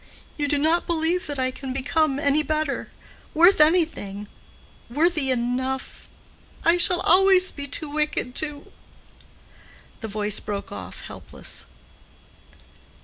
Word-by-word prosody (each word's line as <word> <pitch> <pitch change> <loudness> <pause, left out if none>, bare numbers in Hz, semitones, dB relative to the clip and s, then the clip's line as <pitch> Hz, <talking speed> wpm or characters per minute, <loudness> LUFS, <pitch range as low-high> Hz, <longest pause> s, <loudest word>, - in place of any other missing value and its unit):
You 290 -1 -2
do 290 0 +1
not 320 +4 +1
believe 340 +1 0
that 290 -1 -4
I 255 0 -1
can 260 0 -7
become 275 +2 0
any 285 +1 +2
better—worth 310 +3 0
anything—worthy 300 - -1
enough—I 260 +6 -3
shall 355 0 +6
always 375 +1 +5
be 285 -1 -7
too 305 +3 -2
wicked 300 -4 -2
to—" 295 0 -3 1.3
The 220 - -6
voice 210 0 0
broke 205 -1 -6
off 95 -2 -9
helpless. - - -8
295 Hz, 105 wpm, -23 LUFS, 255-325 Hz, 1.3 s, shall